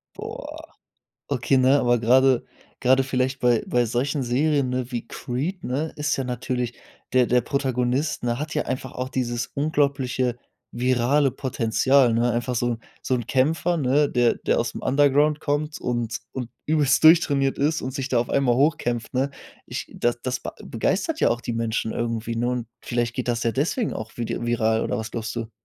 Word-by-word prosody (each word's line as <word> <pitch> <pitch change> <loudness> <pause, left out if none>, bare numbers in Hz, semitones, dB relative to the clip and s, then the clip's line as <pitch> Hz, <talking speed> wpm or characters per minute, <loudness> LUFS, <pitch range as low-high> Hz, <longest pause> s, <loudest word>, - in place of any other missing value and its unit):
Boah. - - -8 0.6
Okay, 125 +3 +1
ne, 130 +2 +5
aber 120 0 +3
gerade 130 +2 +4 0.4
gerade 130 +1 +4
vielleicht 130 0 -1
bei 120 -2 +3
bei 120 -1 +1
solchen 135 +5 -1
Serien, 140 +2 +1
ne, 125 0 -3
wie 120 -1 -4
Creed, 155 +10 -4
ne, 145 +5 -2
ist 150 -2 -1
ja 135 - -2
natürlich 125 -1 -2 0.4
der 125 -1 +5
der 125 +1 +3
Protagonist, 130 +2 -1
ne, 120 0 0
hat 155 +2 -4
ja 150 - 0
einfach 130 0 -4
auch 125 0 -4
dieses 120 -2 -2
unglaubliche 140 -4 0 0.4
virale 130 +3 +2
Potenzial, 130 0 +2
ne? 120 +1 +2
Einfach 120 +1 -2
so 120 - 0
'n 115 - -8 0.2
so 130 - -1
'n 120 -1 -4
Kämpfer, 160 +6 +1
ne, 145 +1 +2
der 120 -1 +2
der - - 0
aus 115 0 -1
dem - - -7
Underground 145 +2 +3
kommt 150 +1 -2
und 120 -2 -2 0.2
und 125 -3 -4 0.2
übelst 150 -3 +3
durchtrainiert 145 -4 +5
ist 150 +3 +1
und 130 0 -4
sich 135 -2 -3
da 125 - +2
auf 120 - -2
einmal 130 -3 +2
hochkämpft, 125 -5 0
ne? 135 +2 0 0.3
Ich - - -5
das 120 0 0
das 125 -1 -3
ba - - -6
begeistert 195 - -1
ja - - +5
auch 120 - 0
die 120 - -3
Menschen 115 -1 -1
irgendwie, 115 0 -2
ne? 120 +1 0
Und 125 -2 -3
vielleicht 120 -1 -1
geht 125 -1 -3
das 115 -1 0
ja 115 - +1
deswegen 175 - 0
auch 110 0 -7
vidi 120 0 -3
viral 115 -1 +1
oder - - -1
was 110 -1 -5
glaubst 115 -2 -4
du? 115 -1 -4
125 Hz, 185 wpm, -24 LUFS, 120-140 Hz, 0.6 s, ne